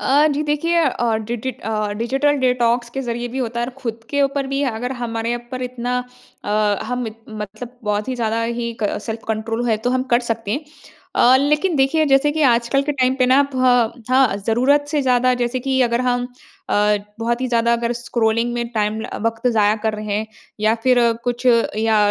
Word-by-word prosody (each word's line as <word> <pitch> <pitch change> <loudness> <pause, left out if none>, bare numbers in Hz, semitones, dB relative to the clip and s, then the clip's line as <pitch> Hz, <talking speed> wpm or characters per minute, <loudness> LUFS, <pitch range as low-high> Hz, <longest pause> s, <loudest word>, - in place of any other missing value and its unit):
अ, 290 +3 +4
जी 290 +2 -1
देखिए 300 +3 0
अ, 240 -4 0
D 220 +2 -4
D 260 +4 -3
ट - - -17
अ, 215 -1 -2
digital 270 +5 +1
detox 245 -2 +1
के - - 0
ज़रिए 240 0 -3
भी 255 - -5
होता 235 -2 -2
है 240 - -1
और 260 - -7
खुद 230 -2 -4
के 285 -1 +1
ऊपर 275 0 0
भी 275 +1 -1
अगर 245 +4 -3
हमारे 230 0 -2
ऊपर 255 +1 -7
इतना 250 0 -3 0.5
अ, - - -3 0.3
हम 250 -1 -3
इत 220 +1 -8
मतलब 220 +3 -8
बहुत 210 +2 -1
ही 255 - -1
ज़्यादा 230 -1 -1
ही 235 0 -3
क 205 - 0
सेल्फ 225 0 -5
कंट्रोल 225 +2 -2
है 220 - +3
तो - - +3
हम 255 0 +1
कर 240 - +4
सकते 225 -2 -2
हैं। 290 +8 -2 0.5
अ, 255 +2 +6
लेकिन 300 +4 +1
देखिए 275 +4 +3
जैसे 275 +2 +4
कि 315 0 0
आजकल 235 +1 +3
के 295 +1 -1
टाइम 260 -1 +1
पे 255 - +3
ना 265 +3 +5
फ - - -3 0.5
हाँ, 255 -5 +4
ज़रूरत 265 +6 +3
से 295 0 0
ज़्यादा 255 0 +3
जैसे 245 +1 -1
कि 265 0 0
अगर 235 0 +1
हम 245 -1 0 0.4
अ, - - 0 0.4
बहुत 235 +2 -1
ही 260 - 0
ज़्यादा 235 0 +2
अगर 235 0 0
स्क्रॉलिंग 235 0 0
में 235 -1 -2
टाइम 215 -1 -1
ल - - -5
अ, - - -6
वक़्त 230 +2 -2
ज़ाया 210 -1 +3
कर 220 - +1
रहे 210 -1 -4
हैं 220 - -3 0.3
या 215 +1 +3
फिर 250 0 +4 0.3
कुछ 245 +1 -2 0.3
या 220 0 +2
240 Hz, 215 wpm, -20 LUFS, 225-260 Hz, 0.5 s, अ